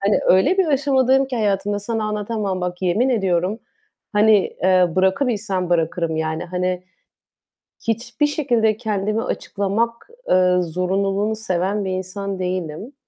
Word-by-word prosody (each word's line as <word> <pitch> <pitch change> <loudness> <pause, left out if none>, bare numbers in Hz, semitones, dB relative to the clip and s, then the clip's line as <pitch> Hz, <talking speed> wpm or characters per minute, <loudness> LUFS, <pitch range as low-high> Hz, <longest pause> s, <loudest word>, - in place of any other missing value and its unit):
Hani, 200 +1 +2
öyle, 190 - +4
bir 375 - +4
aşamadayım 270 -2 +3
ki 255 -2 -4
hayatımda 205 -1 0
sana 220 +1 -3
anlatamam. 210 -2 -2
Bak, 180 +1 -4
yemin 200 +9 +2
ediyorum, 195 -3 0 0.5
hani, 210 0 +5 0.2
eee, 185 -1 +5
bırakabilsem 190 -2 0
bırakırım, 165 -1 0
yani, 160 0 -2
hani, 180 0 -2 1.0
hiçbir 235 +4 0
şekilde 240 -8 +1
kendimi 215 -1 -1
açıklamak, 230 - -2 0.2
eee, 180 0 +4
zorunluluğunu 195 +5 -1
seven 200 -1 -1
bir 190 - -2
insan 190 +1 -4
değilim. 185 - -4
200 Hz, 125 wpm, -21 LUFS, 185-225 Hz, 1.0 s, hani